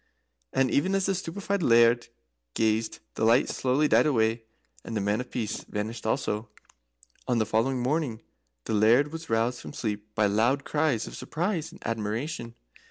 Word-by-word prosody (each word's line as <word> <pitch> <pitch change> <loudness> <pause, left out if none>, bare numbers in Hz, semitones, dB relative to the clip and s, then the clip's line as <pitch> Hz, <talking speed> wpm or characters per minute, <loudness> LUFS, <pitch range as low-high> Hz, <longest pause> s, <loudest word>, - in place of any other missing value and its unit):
And 135 -2 +2
even 185 +7 +2
as 195 -1 +1
the 195 - +1
stupefied 190 +2 -3
Laird 120 -3 +5 0.5
gazed, 110 0 0
the - - -3
light 115 +4 +4
slowly 135 +4 +1
died 120 +2 +4
away, 115 -4 +1 0.4
and 115 - -4
the - - +1
Man 105 +3 0
of 125 - -9
Peace 110 -3 -3
vanished 110 +2 -4
also. 105 0 -1 0.8
On 125 -2 +2
the 110 - +2
following 120 +5 +1
morning 130 -2 -1 0.5
the - - -2
Laird 115 +7 +4
was 165 0 -7
roused 115 +2 0
from - - -9
sleep 105 -2 -3
by 105 - +3
loud 115 +7 +2
cries 145 -7 0
of - - -8
surprise 170 -1 -2
and - - -14
admiration. 115 +3 -3
120 Hz, 165 wpm, -27 LUFS, 110-145 Hz, 0.8 s, Laird